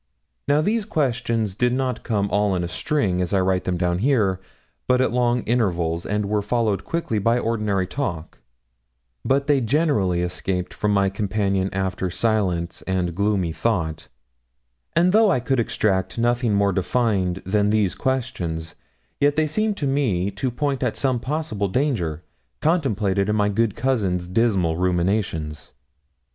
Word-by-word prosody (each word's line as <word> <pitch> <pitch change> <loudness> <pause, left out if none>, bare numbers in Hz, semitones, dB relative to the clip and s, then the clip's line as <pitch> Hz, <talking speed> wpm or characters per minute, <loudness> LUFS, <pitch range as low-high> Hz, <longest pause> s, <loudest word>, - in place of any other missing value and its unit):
Now, 145 +1 +3
these 215 +6 +1
questions 120 - -1
did 125 +4 +1
not 130 -2 -1
come 100 -3 0
all 100 -1 +2
in 90 - -1
a - - -2
string, 95 - 0
as 90 0 -2
I 100 - +4
write 95 0 0
them 90 -1 -1
down 90 0 0
here, 105 -7 +2 0.5
but 125 0 +3
at 130 - +2
long 120 -1 +1
intervals, 85 -8 0
and 105 0 -1
were 105 0 0
followed 105 -3 0
quickly 165 -10 -2
by 115 +4 +2
ordinary 105 -5 0
talk; 90 - -4 0.8
but 140 +1 +1
they 145 -2 +3
generally 115 - +1
escaped 90 +1 -3
from 105 - -1
my 100 -1 +2
companion 100 -1 0
after 95 -1 -2
silence 90 -5 0
and 90 -2 0
gloomy 100 -2 0
thought; 80 -5 -2 0.9
and 175 +2 +4
though 220 0 +5
I 130 - +2
could 125 +2 0
extract 100 -4 0
nothing 120 -2 +1
more 100 -1 +2
defined 95 -2 0
than 105 +2 +2
these 105 -3 +2
questions, 90 - -3 0.5
yet 145 0 +3
they 155 - +2
seemed 210 +7 -1
to 150 - -2
me 115 -10 0
to 125 +6 -2
point 135 +2 -2
at 125 -4 -1
some 130 -3 +1
possible 140 -6 -2
danger 95 - -1 0.4
contemplated 105 - +1
in 105 - +1
my 105 -1 +2
good 110 0 0
cousin's 105 -8 0
dismal 90 -5 +1
ruminations. 90 -5 -1
105 Hz, 155 wpm, -23 LUFS, 95-125 Hz, 0.9 s, though